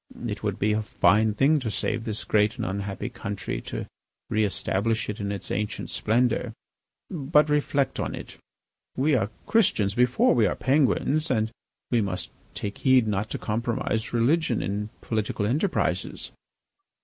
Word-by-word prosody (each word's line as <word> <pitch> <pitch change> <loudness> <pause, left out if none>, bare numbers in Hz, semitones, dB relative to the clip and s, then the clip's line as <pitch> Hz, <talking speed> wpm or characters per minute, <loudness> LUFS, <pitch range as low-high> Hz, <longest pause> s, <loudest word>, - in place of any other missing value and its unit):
It - - -3
would - - -2
be 105 +1 +2
a 110 - +1
fine 110 0 +3
thing 145 +7 +4
to 125 -5 -3
save 115 +2 -2
this 110 -1 -3
great 105 +1 +2
and 115 - -2
unhappy 100 +1 -3
country, 105 -5 -4
to - - -4 0.5
re 110 0 +2
establish 105 +2 0
it 105 - -4
in 100 -1 -2
its 100 - -6
ancient 105 +1 -3
splendour. 120 +1 +1 0.6
But 150 -2 +3
reflect 145 -1 +1
on - - -2
it, - - -10 0.6
we 145 +4 +2
are 110 -6 +2 0.2
Christians 105 - +2
before 125 +2 +3
we 115 -4 +4
are - - -1
Penguins. 150 +3 +2
And 110 -3 +1 0.4
we 120 -2 +3
must 95 -3 -3 0.2
take 100 0 -4
heed 130 -3 +4
not 105 0 -1
to - - -3
compromise 115 0 -2
religion 125 +2 +2
in 105 +2 -2
political 105 -2 -1
enterprises." 150 - -1
110 Hz, 155 wpm, -26 LUFS, 105-130 Hz, 0.6 s, thing